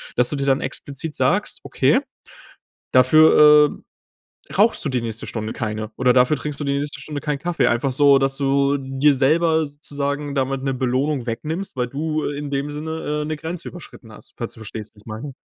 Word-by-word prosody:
dass 125 Hz, 0 st, +3 dB
du -, -, -1 dB
dir 140 Hz, -1 st, -2 dB
dann 135 Hz, -1 st, +2 dB
explizit 145 Hz, +2 st, -5 dB
sagst, -, -, 0 dB
okay, -, -, +2 dB, 0.9 s
dafür, 150 Hz, +2 st, +7 dB
äh, -, -, -19 dB, 0.7 s
rauchst 215 Hz, +4 st, +3 dB
du -, -, +1 dB
die 125 Hz, -2 st, -1 dB
nächste 115 Hz, -1 st, -5 dB
Stunde 110 Hz, -1 st, -4 dB
keine, 110 Hz, -1 st, -4 dB
oder 125 Hz, -1 st, +3 dB
dafür 125 Hz, +4 st, +4 dB
trinkst 150 Hz, -2 st, -5 dB
du -, -, -3 dB
die 140 Hz, -, -1 dB
nächste 145 Hz, 0 st, -4 dB
Stunde 150 Hz, -2 st, -4 dB
keinen 150 Hz, -1 st, -2 dB
Kaffee. 175 Hz, +3 st, 0 dB
Einfach 120 Hz, +3 st, +1 dB
so, 140 Hz, +1 st, +5 dB
dass 135 Hz, 0 st, 0 dB
du 140 Hz, 0 st, +2 dB
dir 135 Hz, +2 st, +2 dB
selber 160 Hz, +4 st, +2 dB
sozusagen 145 Hz, 0 st, -4 dB
damit 135 Hz, 0 st, -1 dB
'ne 135 Hz, -1 st, -1 dB
Belohnung 130 Hz, +1 st, -1 dB
wegnimmst, 155 Hz, +11 st, -4 dB
weil 125 Hz, -2 st, -1 dB
du, 155 Hz, +3 st, -2 dB
äh, 145 Hz, 0 st, -3 dB
in 145 Hz, -1 st, -5 dB
dem 140 Hz, +1 st, -2 dB
Sinne, 150 Hz, 0 st, -3 dB
äh, -, -, -5 dB
'ne 155 Hz, +1 st, -3 dB
Grenze 165 Hz, +3 st, -6 dB
überschritten 155 Hz, -9 st, -11 dB
hast, -, -, -14 dB
falls 115 Hz, -, -4 dB
du 110 Hz, -, -13 dB
verstehst, 110 Hz, 0 st, -8 dB
was 105 Hz, -, -18 dB
ich -, -, -26 dB
meine. 115 Hz, +6 st, -7 dB
140 Hz, 200 wpm, -21 LUFS, 130-150 Hz, 0.9 s, dafür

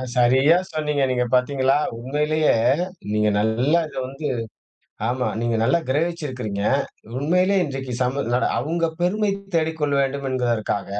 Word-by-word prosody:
சரியா 130 Hz, +6 st, +5 dB, 0.2 s
சொன்னீங்க. 150 Hz, -3 st, 0 dB
நீங்க 125 Hz, -1 st, +1 dB
பார்த்தீங்களா? 130 Hz, +1 st, +2 dB, 0.2 s
உண்மையிலேயே 150 Hz, +5 st, +1 dB, 0.6 s
நீங்க 105 Hz, 0 st, +2 dB
நல்லா 120 Hz, +10 st, +2 dB
இத -, -, -11 dB
வந்து 135 Hz, +3 st, -5 dB, 0.8 s
ஆமா 125 Hz, +1 st, -1 dB
நீங்க 115 Hz, -1 st, 0 dB
நல்லா 170 Hz, +9 st, +3 dB
கிரகிச்சு 165 Hz, +4 st, 0 dB
இருக்கறீங்க. 110 Hz, -6 st, -4 dB, 0.6 s
உண்மையிலேயே 180 Hz, +7 st, +2 dB
இன்றைக்கு 135 Hz, -2 st, -5 dB
சமூ 130 Hz, +3 st, 0 dB, 0.4 s
அவங்க 165 Hz, +5 st, 0 dB
பெருமை 200 Hz, +4 st, +1 dB, 0.2 s
தேடிக் 160 Hz, -1 st, 0 dB
கொள்ள 145 Hz, -1 st, +1 dB
வேண்டும் 140 Hz, 0 st, -2 dB
என்பதற்காக 120 Hz, -5 st, -1 dB
135 Hz, 125 wpm, -22 LUFS, 125-155 Hz, 0.8 s, சரியா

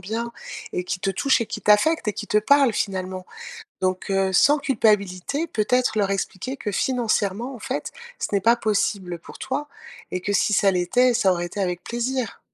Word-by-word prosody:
bien 225 Hz, +5 st, -4 dB, 0.4 s
et 180 Hz, -, -1 dB
qui 180 Hz, +2 st, -3 dB
te 195 Hz, -, -1 dB
touche 265 Hz, +7 st, +2 dB
et 230 Hz, -, -1 dB
qui -, -, -6 dB
t'affecte 210 Hz, +7 st, +3 dB
et 210 Hz, -, +1 dB
qui 210 Hz, -, -6 dB
te 210 Hz, -, +3 dB
parle 275 Hz, +3 st, +4 dB
finalement. 185 Hz, -2 st, -3 dB, 0.5 s
Donc 185 Hz, +1 st, -1 dB
heu, 195 Hz, -1 st, +1 dB
sans 290 Hz, +11 st, +5 dB
culpabilité, 220 Hz, -, +1 dB
peut-être 245 Hz, -2 st, +1 dB
leur 200 Hz, -1 st, +1 dB
expliquer 195 Hz, +6 st, -3 dB
que 210 Hz, -6 st, -4 dB
financièrement, 230 Hz, 0 st, 0 dB
en -, -, -9 dB
fait, 270 Hz, +3 st, -4 dB, 0.3 s
ce -, -, -1 dB
n'est 200 Hz, -, +2 dB
pas 230 Hz, +4 st, +4 dB
possible 200 Hz, -5 st, -1 dB
pour -, -, -13 dB
toi 290 Hz, +3 st, -3 dB, 0.4 s
et 185 Hz, -, -2 dB
que 205 Hz, +3 st, -2 dB
si 205 Hz, -, +2 dB
ça 200 Hz, -1 st, +4 dB
l'était, 240 Hz, +8 st, +2 dB
ça 215 Hz, -5 st, +3 dB
aurait 175 Hz, -1 st, -2 dB
été 190 Hz, +4 st, -6 dB
avec 180 Hz, -2 st, -2 dB
plaisir. 240 Hz, -1 st, -3 dB
210 Hz, 190 wpm, -23 LUFS, 190-250 Hz, 0.5 s, sans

